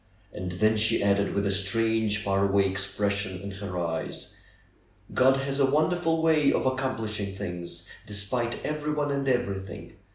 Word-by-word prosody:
And 95 -3 -5
then 110 +4 +2
she 110 0 +3
added, 100 0 +2
with 100 0 +1
a 100 - +1
strange, 110 +2 +1
far 100 -1 +2
away 100 0 +3
expression 100 0 -1
in 100 +1 -6
her 95 -2 -6
eyes: 85 -2 -4 0.8
^^God 130 +1 +4
has 135 +1 -2
a 135 -1 +4
wonderful 160 +2 +1
way 155 -3 +4
of - - 0
accomplishing 110 -7 -1
things, 90 -3 -6 0.2
despite 105 +4 -2
everyone 150 -1 -1
and 140 -1 0
everything. 100 -4 -3
105 Hz, 150 wpm, -27 LUFS, 100-135 Hz, 0.8 s, ^^God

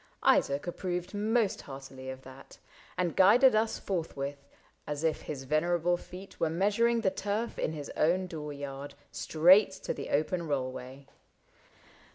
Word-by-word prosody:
Isaac 140 +1 +3
approved 180 +1 -4
Most 215 +1 +1
heartily 135 -1 -9
of 130 0 -8
that, 130 +1 -13 0.4
and 175 -2 0
guided 225 +7 +6
us 220 +1 +1
Forthwith, 140 -6 -4 0.4
as 150 +1 -3
if 160 -1 +1
his 140 -3 -6
venerable 170 +5 +1
feet 185 +2 -11
Were 165 - +2
measuring 210 +7 +2
the 190 -4 +2
turf 205 +4 -3
in 155 - -1
his 145 -2 -6
own 180 +4 +2
door 155 -4 -6
yard. 140 0 -7 0.2
Straight 185 +5 +5
to - - -1
the - - -7
open 165 +3 0
rollway. 130 -1 -4
165 Hz, 145 wpm, -30 LUFS, 140-195 Hz, 0.4 s, guided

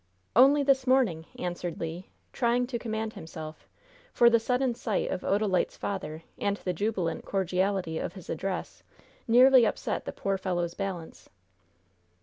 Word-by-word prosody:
"Only 275 +4 +6
this 270 -2 +2
morning," 225 -12 +2
answered 175 -1 -4
Le, 165 +3 -5 0.3
trying 245 0 +2
to 245 -1 -4
command 220 -1 -3
himself, 160 -5 -9 0.4
for 235 0 +5
the 230 - +5
sudden 250 +2 0
sight 225 -3 -2
of - - -2
Odalite's 200 -3 +1
father 165 -5 -4 0.2
and 200 0 0
the 180 - -3
jubilant 185 -3 -2
cordiality 185 -3 -1
of - - -4
his 185 -3 -11
address 185 +3 -4 0.5
nearly 250 +2 +7
upset - - -1
the - - -3
poor 195 -1 -2
fellow's 175 -2 -1
balance. 185 -4 -6
195 Hz, 140 wpm, -28 LUFS, 175-235 Hz, 0.5 s, nearly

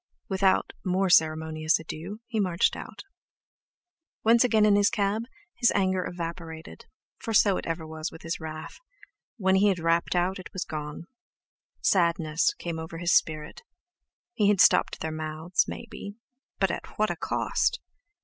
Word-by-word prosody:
Without 190 -1 +2
more 185 0 +1
ceremonious 155 0 +3
adieux, 170 +7 -7
he 230 -3 -3
marched 180 -3 +2
out. - - -9 1.2
Once 230 +2 +5
again 220 -4 +4
in 210 -1 +5
his 205 0 +4
cab, 210 +2 0 0.3
his 240 -1 +3
anger 190 -2 +1
evaporated, 165 - -7 0.3
for 225 - -3
so 200 -1 +5
it - - -5
ever 165 -1 -3
was 155 +1 -5
with 160 - -12
his 165 +1 -3
wrath—when 190 - -4
he 205 +2 +4
had 195 -3 +2
rapped 165 +1 +1
out, 180 +2 +1
it 185 - -10
was 190 - -3
gone. 150 0 -6 0.8
Sadness 170 -3 +2
came 170 -2 -5
over 160 +1 -7
his 175 0 +1
spirit. 155 -1 0 0.7
He 210 - +2
had 205 -2 +3
stopped - - +4
their 160 - -2
mouths, 155 +3 -1
maybe, 200 0 -8 0.4
but 195 -2 +2
at - - -7
what 215 0 +2
a - - -3
cost! 485 - 0
175 Hz, 150 wpm, -27 LUFS, 160-200 Hz, 1.2 s, Once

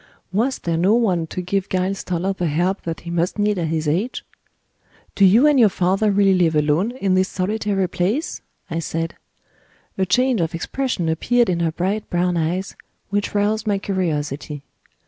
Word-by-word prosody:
Was 235 +8 0
there 165 -1 -2
no 190 +6 +3
one 185 -9 +1
to 180 - -5
give 195 +2 -1
Giles 190 +1 -1
Toller 180 +2 -1
the 180 -3 -2
help 175 +6 0
that 165 -1 -4
he 170 - -7
must 170 +3 -1
need 205 -2 +1
at 165 - -1
his 160 -1 -1
age? 185 +12 -1 0.9
"Do 200 - +2
you 215 +9 +6
and 295 -3 +5
your 225 -3 +6
father 190 +3 +1
really 200 -1 +4
live 170 -4 +2
alone 150 +7 +2
in 200 -7 0
this 185 +1 +2
solitary 200 0 -1
place?" 210 - -2 0.3
I 165 -2 -3
said. 165 0 -3 0.8
A 190 - +1
change 250 +2 +2
of 165 0 -1
expression 225 0 -2
appeared 230 +7 +2
in 170 - -1
her 165 -1 +1
bright 195 +6 -2
brown 175 0 +1
eyes 170 +4 -2 0.4
which 205 0 -1
roused 215 +2 +1
my 205 -1 +2
curiosity. 150 -7 -3
185 Hz, 180 wpm, -21 LUFS, 170-205 Hz, 0.9 s, you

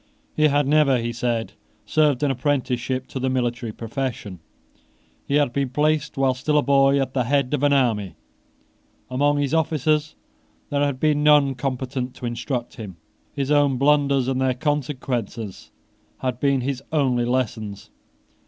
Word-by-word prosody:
He 155 0 +4
had 145 -1 +2
never, 145 -3 +4
he 120 0 -3
said, 120 -1 -2 0.3
served 150 -3 +2
an 145 - +2
apprenticeship 130 -1 -1
to 130 - -5
the 130 +1 0
military 120 -2 -1
profession. 115 -5 -5 0.9
He 140 - 0
had 145 -5 +2
been 140 -1 -1
placed, 150 +2 0
while 135 -1 +2
still 150 +4 0
a 145 - +3
boy, 140 0 +4
at 130 -1 -2
the 125 -3 0
head 140 +1 +1
of 150 - 0
an 145 0 +3
army. 115 - +1 1.0
Among 145 +3 +2
his 145 0 -1
officers 155 -1 +1 0.6
there 145 0 +1
had 140 -3 -1
been 150 0 +2
none 150 -2 +5
competent 130 0 -4
to - - -7
instruct 120 +1 -4
him. 100 -7 -8 0.4
His 140 0 -2
own 145 -3 +3
blunders 140 -1 +3
and 130 0 0
their 130 -1 +1
consequences 125 - -3 0.5
had 125 -2 -3
been 140 -2 +2
his 135 0 -3
only 130 -6 +1
lessons. 110 -5 -3
135 Hz, 155 wpm, -23 LUFS, 125-145 Hz, 1.0 s, none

